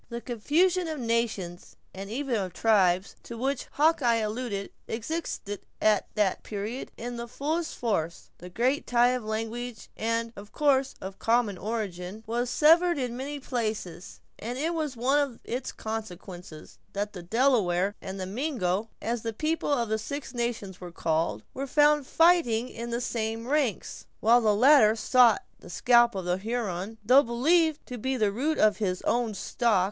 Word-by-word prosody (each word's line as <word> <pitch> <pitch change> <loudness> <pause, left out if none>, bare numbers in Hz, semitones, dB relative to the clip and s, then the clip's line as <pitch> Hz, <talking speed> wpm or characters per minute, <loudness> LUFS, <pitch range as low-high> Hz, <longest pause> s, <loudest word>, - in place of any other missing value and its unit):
The 235 -1 -4
confusion 330 - +1
of 310 -2 -4
nations, 225 -7 -2 0.2
and 195 +1 -7
even 265 +3 -3
of 190 -5 -2
tribes, 190 -4 +2
to 235 - -9
which 265 +2 -2
Hawkeye 290 -6 +3
alluded, 215 -2 -3 0.2
existed 225 -4 -4 0.2
at 215 -2 +3
that 205 -3 +1
period 215 +5 -5
in 240 +1 -5
the 235 0 -5
fullest 310 +7 -2
force. 170 -8 -2
The 180 - -9
great 250 +9 0
tie 245 0 +4
of 250 -1 -1
language, 225 +2 -5
and, 230 +1 -1
of 205 +1 -11
course, 275 -3 +2
of 190 +1 -6
a - - -34
common 230 -3 +1
origin, 205 -2 -4
was 240 +2 -1
severed 335 +5 +5
in 250 -3 -2
many 280 +3 -5
places; 215 -9 -4 0.2
and 240 +3 -5
it 320 +5 -1
was 305 -6 -3
one 265 +5 +2
of 275 -5 -2
its 250 +2 -4
consequences, 180 -7 -8
that 205 +1 -3
the 180 - -7
Delaware 200 -3 +2
and 190 0 -6
the 185 - -3
Mingo 215 - -2
(as 235 0 -1
the 225 0 -3
people 310 +5 -1
of 240 -5 +1
the 220 0 0
Six 280 +3 -6
Nations 235 -6 -3
were 175 -1 -7
called) 165 -1 -1
were 275 +1 -4
found 295 0 +3
fighting 325 -9 +3
in 235 +1 -6
the 235 +1 -2
same 225 -1 -3
ranks, 275 -7 -1
while 235 +3 +5
the 215 -2 +3
latter 245 -2 +6
sought 250 - +4 0.2
the - - -13
scalp 240 -2 +4
of 190 -2 -4
the 180 +1 0
Huron, 215 -2 -3
though 255 +5 +7
believed 300 +6 +2
to 250 -1 -7
be 260 +3 -1
the 210 -3 +2
root 290 +9 -1
of 215 -1 +4
his 185 -4 -2
own 235 -3 0
stock. 220 +1 +1
235 Hz, 170 wpm, -27 LUFS, 205-265 Hz, 0.2 s, though